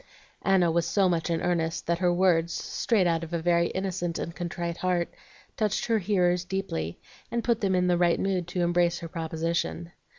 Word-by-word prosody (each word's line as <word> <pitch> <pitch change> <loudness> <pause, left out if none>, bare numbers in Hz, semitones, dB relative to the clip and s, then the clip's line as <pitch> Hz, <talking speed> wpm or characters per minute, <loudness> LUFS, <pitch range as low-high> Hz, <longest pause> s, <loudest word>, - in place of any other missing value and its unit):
Anna 185 -3 +3
was 170 0 +1
so 195 -2 +3
much 170 -1 0
in 165 -1 0
earnest 170 -2 0
that 170 0 0
her 180 -1 +3
words, 175 -2 +2
straight 215 -6 0
out 165 -1 +1
of 165 +1 -7
a 170 - 0
very 170 0 +3
innocent 185 -3 -2
and 170 - -5
contrite 170 0 -4
heart, 180 -2 0 0.4
touched 215 -2 0
her 230 -2 +2
hearers 180 -3 +2
deeply, 180 - -3 0.3
and 235 -1 -2
put 235 -2 +1
them 195 -2 +2
into 180 0 +2
the 175 -1 +2
right 175 -1 +3
mood 185 -3 -1
to 175 0 -2
embrace 175 0 +2
her 170 - -5
proposition. 165 +1 -3
175 Hz, 195 wpm, -27 LUFS, 170-185 Hz, 0.4 s, Anna